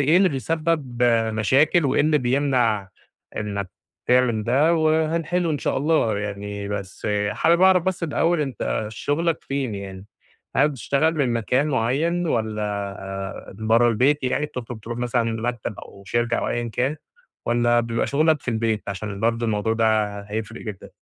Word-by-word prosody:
إيه 150 +5 +4
اللي 190 0 +5
بيسبّب 145 -2 -1 0.3
مشاكل 140 - +3
وإيه 135 - +2
اللي 150 0 +3
بيمنع 125 -6 +1 0.5
إنّك 100 -3 -3 0.4
تعمل 125 -4 +3
ده، 145 +9 +3
وهنحلّه 160 +2 +1
إن 145 - -1
شاء - - -1
الله 135 -7 +2
يعني، 100 0 -5
بس 100 0 -5 0.2
حابب 170 - +2
أعرف 190 -2 +6
بس 190 0 -2
الأول 165 +1 +1
أنت 125 -5 -2
شغلك 160 +8 -1
فين 135 -6 -2
يعني؟ 95 -1 -8 0.5
هل 140 +4 +5
بتشتغل 145 +3 0
من 130 -5 +1
مكان 125 +5 +1
معيّن 150 +8 0
والَّا 110 -6 -1 0.4
آآ، 95 0 -6
برّه 115 +2 +3
البيت 130 +5 +2
يعني 145 +4 0
بتطلب 125 -5 -7
ترُوح 120 +2 -6
مثلًا 120 -1 0 0.2
مكتب 120 -3 -3
أو 100 - -12
شركة 120 +3 0
أو - - -1
أيًا 120 0 -2
كان 130 +6 -1 0.5
والَّا 120 0 +3
بيبقى 115 0 -1
شغلك 155 +1 +2
في - - -9
البيت؟ 110 -1 0
عشان 100 0 -5
برضه 115 +1 +1
الموضوع 110 0 0
ده 110 -2 +1
هيفرِق 110 +2 -5
جدًا. 105 -4 -8
120 Hz, 155 wpm, -23 LUFS, 110-150 Hz, 0.5 s, أعرف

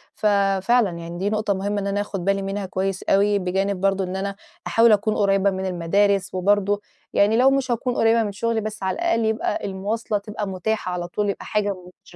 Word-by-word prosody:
ف - - -6 0.4
فعلًا 235 0 +3
يعني 170 +1 -7
دي 195 +3 -1
نُقطة 215 -1 0
مُهمة 200 +2 -2
إن 200 - -3
أنا 200 +1 0
آخد 195 -3 -5
بالي 195 0 +1
منها 195 +1 -3
كويس 190 0 -2
أوي، 200 +1 +3
بجانب 190 +1 -1
برضه 195 0 +1
إن 185 0 -4
أنا 195 +1 -3 0.3
أحاول 230 0 +5
أكون 215 +1 +2
قريبة 200 -1 +3
من 190 0 -3
المدارس، 190 +3 +1
وبرضه 205 +2 +1 0.3
يعني 215 +3 +3
لو 265 +2 +5
مش 270 -2 0
هاكون 245 +1 -1
قريبة 225 0 +3
من 205 - -3
شُغلي، 225 +2 -1
بس 215 -1 -6
على 190 - 0
الأقل 340 -10 0
يبقى 220 -1 -1
المواصلة 205 +3 -2
تبقى 205 0 -5
مُتاحة 190 +1 -2
على 175 -1 -3
طول، 205 +3 -1
يبقى 200 - -4
حاجة 205 -2 0 0.3
مش - - -16
200 Hz, 205 wpm, -23 LUFS, 190-215 Hz, 0.4 s, أحاول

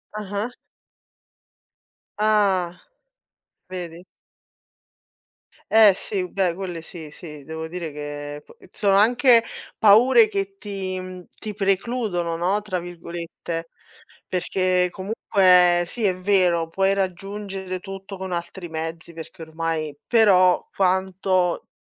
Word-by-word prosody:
Ah-ah. 210 +3 -4 1.7
Ah. 195 -5 +2 0.9
Vedi. 175 -1 -7 1.7
Eh 220 -3 +8
sì, 190 -2 -3
beh 185 -3 0
quelle 180 -3 -5
sì, 160 -2 -10
sì, 150 -2 -11
devo 160 0 -6
dire 170 -2 -5
che 145 0 -7
p - - -18
sono 200 -2 +2
anche 235 +3 +5 0.3
paure 240 - +6
che 395 -1 -4
ti, 190 - -5
mhmm, 185 -1 -9
ti 215 -1 -6
"precludono", 195 -3 -1
no, 185 +5 0
tra 185 -3 -3
virgolette, 170 -1 -7 0.6
perché 185 0 +1
comunque 185 -3 +3
sì, 230 +6 -6
è 190 -3 +2
vero, 180 -3 +2
puoi 195 +3 +2
raggiungere 195 0 -4
tutto 195 +1 -8
con 190 0 -6
altri 175 +1 -5
mezzi 165 +1 -6
perché 165 +2 -10
ormai 160 -2 -3
però 190 -6 +4
quanto 185 -1 +1
185 Hz, 105 wpm, -23 LUFS, 170-200 Hz, 1.7 s, Eh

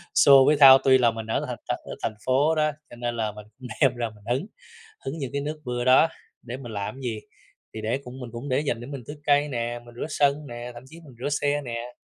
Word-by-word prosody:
xô 135 -1 +7
với 150 - +4
thau, 135 -2 +10
tuy 130 -1 +6
là 120 -3 +3
mình 110 0 -7
ở 110 - -1
thành - - -4
thành - - -1
ở - - -7
thành 110 - -1
phố 140 +5 +3
đó, 155 0 +2 0.2
cho - - -11
nên 120 0 -3
là 110 -2 -1
mình 105 0 -11
cũng 125 - -8
đem 130 -3 +4
ra 120 -2 -2
mình 105 -2 -18
hứng, 140 +9 -3 0.6
hứng 150 +5 -4
những 135 -3 -4
cái 140 - -1
nước 150 +2 -5
mưa 120 -1 -2
đó, 130 +5 +6 0.3
để 120 +2 -6
mình 120 -4 -9
làm 100 +2 -4
cái 135 - -11
gì? 115 -3 -3 0.6
Thì 110 - -5
để 115 +5 -1
cũng 125 +2 -9
mình 120 -2 -7
cũng 120 +4 -6
để 130 - +1
dành 120 -6 -2
để 120 - -8
mình 140 -3 -7
tưới 145 - -7
cây 145 0 +3
nè, 120 -2 -3
mình 120 - -14
rửa 120 - -4
sân 145 0 +1
nè, 120 0 -7
thậm 120 - -10
chí 160 +5 -14
mình 135 -5 -14
rửa 145 - -2
xe 145 0 0
nè. 120 0 -6
130 Hz, 275 wpm, -25 LUFS, 120-145 Hz, 0.6 s, thau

